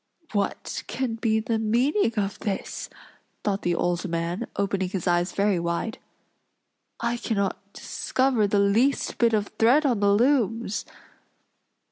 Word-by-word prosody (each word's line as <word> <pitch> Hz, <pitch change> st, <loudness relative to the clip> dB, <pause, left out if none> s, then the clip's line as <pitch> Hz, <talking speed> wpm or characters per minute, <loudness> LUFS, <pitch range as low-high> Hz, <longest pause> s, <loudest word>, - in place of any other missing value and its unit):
"What 200 Hz, -2 st, -2 dB
can 260 Hz, -3 st, -2 dB
be 225 Hz, -1 st, +1 dB
the 225 Hz, 0 st, -1 dB
meaning 235 Hz, -, +2 dB
of 200 Hz, -1 st, -1 dB
this?" 200 Hz, -3 st, -4 dB, 0.5 s
thought 200 Hz, -1 st, 0 dB
the 175 Hz, -1 st, 0 dB
old 175 Hz, +1 st, -1 dB
man, 170 Hz, +2 st, -2 dB
opening 195 Hz, -2 st, 0 dB
his 185 Hz, -2 st, -3 dB
eyes 175 Hz, 0 st, +2 dB
very 200 Hz, -2 st, +1 dB
wide. 170 Hz, +6 st, -2 dB, 1.0 s
"I 235 Hz, +1 st, -1 dB
cannot 200 Hz, -4 st, -1 dB
discover 255 Hz, -5 st, 0 dB
the 205 Hz, -, +1 dB
least 215 Hz, +8 st, +2 dB
bit 235 Hz, -1 st, +4 dB
of 210 Hz, -2 st, +1 dB
thread 255 Hz, +7 st, +5 dB
on 245 Hz, -6 st, +2 dB
the 200 Hz, 0 st, +3 dB
looms." 230 Hz, -2 st, +1 dB
210 Hz, 135 wpm, -25 LUFS, 195-235 Hz, 1.0 s, thread